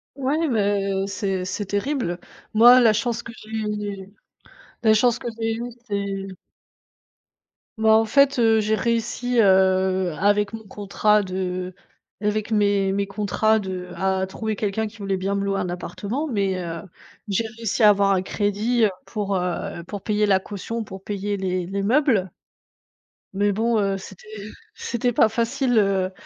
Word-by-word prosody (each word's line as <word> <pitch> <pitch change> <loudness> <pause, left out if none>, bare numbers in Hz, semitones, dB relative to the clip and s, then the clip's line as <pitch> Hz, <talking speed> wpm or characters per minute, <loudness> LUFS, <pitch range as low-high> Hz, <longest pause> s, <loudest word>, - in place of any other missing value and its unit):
Ouais, 290 +4 0
mais 200 -4 0
c'est 195 -2 -2
c'est 200 +2 -3
terrible. 205 -4 -2 0.3
Moi, 240 +3 +8
la 230 -3 +6
chance 235 +2 -1
que 230 - -9
j'ai 210 -3 -5 0.7
la 220 -1 +5
chance 240 +2 +3
que 240 - -5
j'ai 225 0 0
eu 235 - -5 0.2
c'est 200 -2 -3 1.5
Bah, 220 0 +2
en 220 0 +5
fait, 275 +2 +3
heu, 225 -1 +4
j'ai 215 +1 0
réussi, 235 +1 0
heu, 190 -2 +3
avec 205 +1 +2
mon 220 0 -7
contrat 210 +1 +1
de 185 -1 -4 0.5
avec 210 +1 -1
mes 200 -2 +2
mes 200 0 0
contrats 210 +2 +1
de 185 -2 -6
à 190 0 0
trouver 215 +3 -4
quelqu'un 215 +2 -1
qui 225 +1 -13
voulait 195 -2 -2
bien 195 +2 -2
me 200 - -1
louer 195 0 0
un 180 -2 -2
appartement, 210 - -4
mais 200 -8 -1
heu, 170 -1 -5 0.5
j'ai 205 +3 0
réussi 225 0 0
à 210 - +9
avoir 200 -1 +4
un 185 0 +1
crédit, 215 +4 +1
heu, - - +3 0.2
pour, 200 -3 -2
heu, 175 -1 -3
pour 200 +2 -7
payer 210 -1 +1
la 190 -2 +3
caution, 215 +4 -5
pour 190 -1 -10
payer 205 0 -3
les 185 -2 -2
les 195 +1 -3
meubles 225 - +2 1.0
mais 205 +1 +1
bon, 225 +3 +1
heu, 195 -1 0
c'était 190 +2 -12 0.5
c'était 245 +1 -2
pas 225 - +5
facile, 240 +2 0
heu, 195 -2 +1
205 Hz, 160 wpm, -23 LUFS, 195-225 Hz, 1.5 s, à